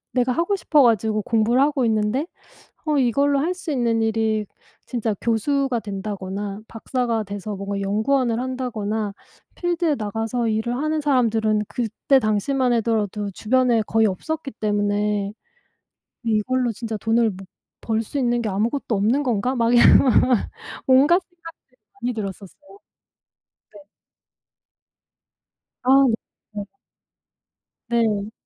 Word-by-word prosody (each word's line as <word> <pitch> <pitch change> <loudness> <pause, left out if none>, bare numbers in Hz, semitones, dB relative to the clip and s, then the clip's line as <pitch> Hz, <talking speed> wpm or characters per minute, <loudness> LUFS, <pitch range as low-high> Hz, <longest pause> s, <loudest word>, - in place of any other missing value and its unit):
내가 250 0 +2
하고 340 +9 0
싶어 305 -6 +3
가지고 220 -2 +2
공부를 230 +3 +2
하고 280 -3 +2
있는데 220 +6 0 0.6
어 305 -2 +1
이걸로 275 +2 +2
할 330 +6 0
수 365 -3 -6
있는 235 -4 +1
일이 220 -1 0 0.4
진짜 230 -3 -1
교수가 250 +3 0
된다거나 200 0 -5
박사가 235 -1 -2
돼서 205 +1 -6
뭔가 200 +1 -4
연구원을 230 +4 +1
한다거나' 220 -5 -3 0.4
필드에 345 -3 0
나가서 225 +2 -2
일을 220 +2 -1
하는 310 +2 -1
사람들은 225 -6 +2
그때 245 +3 +1
당시만 245 +4 +1
하더라도 215 -3 -1
주변에 240 +2 +2
거의 225 +1 +2
없었기 290 - -4
때문에 205 -1 0 0.9
'이걸로 235 +2 +1
진짜 225 0 -5
돈을 225 +2 +2
못 195 0 -10 0.4
벌 225 0 0
수 255 +6 -5
있는 240 -2 +1
게 220 - -2
아무것도 225 +4 -1
없는 225 +8 +2
건가?' 250 -1 0
막 235 -2 +1
이런 240 - +7
막, 255 -5 +4
막 250 -4 +1 0.4
온갖 285 +8 +5
생각들이 330 -7 -15 0.3
많이 245 +1 0
들었었어요. 210 - -8 1.0
네. 205 - -13 2.0
아. 270 +2 +5
네, 230 - +2 0.4
네. 205 -1 -4 1.2
네. 220 -3 0
230 Hz, 270 characters per minute, -22 LUFS, 210-260 Hz, 2.0 s, 이런